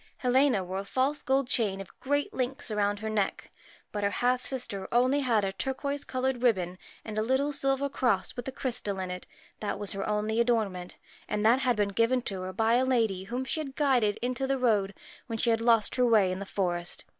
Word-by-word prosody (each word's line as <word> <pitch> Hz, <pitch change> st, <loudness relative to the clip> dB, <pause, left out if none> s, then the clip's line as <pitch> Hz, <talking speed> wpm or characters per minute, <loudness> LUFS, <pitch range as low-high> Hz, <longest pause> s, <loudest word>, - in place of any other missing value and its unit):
Helena 255 Hz, -4 st, +3 dB
wore 185 Hz, +1 st, -4 dB
a -, -, -4 dB
false 265 Hz, +7 st, 0 dB
gold 265 Hz, -1 st, +1 dB
chain 205 Hz, -6 st, 0 dB
of 195 Hz, -, -11 dB
great 285 Hz, +2 st, -1 dB
links 255 Hz, -1 st, -2 dB
round 205 Hz, -1 st, +1 dB
her 220 Hz, -, -3 dB
neck, 205 Hz, -3 st, -1 dB, 0.4 s
but 205 Hz, -1 st, -3 dB
her 200 Hz, -, +3 dB
half 250 Hz, +4 st, +1 dB
sister 250 Hz, -7 st, -3 dB
had 190 Hz, -, -7 dB
only 255 Hz, +4 st, +3 dB
a 215 Hz, -6 st, +2 dB
turquoise 275 Hz, +7 st, -3 dB
coloured 255 Hz, -1 st, -1 dB
ribbon 185 Hz, -7 st, +1 dB, 0.3 s
and 215 Hz, -1 st, -3 dB
a -, -, +2 dB
little 265 Hz, +5 st, +1 dB
silver 275 Hz, 0 st, +1 dB
cross 235 Hz, -9 st, 0 dB
with 245 Hz, 0 st, -6 dB
a -, -, -2 dB
crystal 230 Hz, -6 st, -3 dB
in 185 Hz, -1 st, -3 dB
it 180 Hz, 0 st, -7 dB, 0.3 s
that 210 Hz, -, -2 dB
was 205 Hz, -1 st, -3 dB
her 195 Hz, +1 st, -3 dB
only 215 Hz, +2 st, +1 dB
ornament 205 Hz, -7 st, -1 dB, 0.3 s
and 210 Hz, 0 st, -1 dB
that 235 Hz, +4 st, +5 dB
had 255 Hz, -2 st, +2 dB
been 205 Hz, -1 st, +1 dB
given 230 Hz, +5 st, +2 dB
her 185 Hz, -1 st, -4 dB
by 225 Hz, +4 st, +2 dB
a 255 Hz, -, +3 dB
lady 225 Hz, -8 st, +1 dB
whom 245 Hz, +5 st, -3 dB
she 315 Hz, -, -2 dB
had 275 Hz, -3 st, -5 dB
guided 250 Hz, -8 st, +2 dB
into 255 Hz, +2 st, -1 dB
the 270 Hz, 0 st, +1 dB
road, 210 Hz, -6 st, +1 dB, 0.3 s
when 225 Hz, -2 st, -3 dB
she 230 Hz, +1 st, +2 dB
had 225 Hz, 0 st, +1 dB
lost 230 Hz, -2 st, +3 dB
her 250 Hz, -, +4 dB
way 210 Hz, -5 st, +4 dB
in 185 Hz, -, -3 dB
the 200 Hz, -, -6 dB
forest. 175 Hz, -3 st, -2 dB
230 Hz, 215 wpm, -29 LUFS, 200-260 Hz, 0.4 s, that